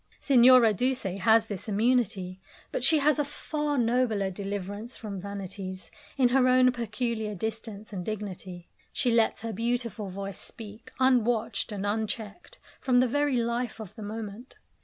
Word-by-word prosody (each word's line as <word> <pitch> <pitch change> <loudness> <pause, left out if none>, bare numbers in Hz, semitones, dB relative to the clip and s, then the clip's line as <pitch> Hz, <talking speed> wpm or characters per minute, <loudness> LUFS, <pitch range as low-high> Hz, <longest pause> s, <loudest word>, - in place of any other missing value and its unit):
Signora 250 -4 +6
Duse 255 +5 0 0.2
has 220 +3 +5
this 205 -1 -6
immunity, 205 -4 0 0.3
but - - -3
she 315 +4 +6
has 300 +1 +3
a - - +3
far 295 0 -3
nobler 230 -5 +1
deliverance 205 +4 -5
from 200 -4 -6
vanities, 190 -2 -7 0.3
in 255 -3 +4
her 255 0 +4
own 255 0 +5
peculiar 230 -2 -3
distance 220 +1 -5
and 185 -2 -4
dignity. 190 -4 -6 0.2
She 250 -4 +1
lets 230 -3 +2
her 225 -1 -3
beautiful 230 -2 -2
voice 195 +1 -6
speak, 220 0 -9
unwatched 245 -4 +2
and 205 -1 -4
unchecked, 220 - -4 0.2
from 250 -2 +3
the 255 - +4
very 290 +1 +1
life 235 0 -1
of 215 -5 -8
the 225 - -11
moment. 215 +3 -7
225 Hz, 150 wpm, -28 LUFS, 200-250 Hz, 0.3 s, Signora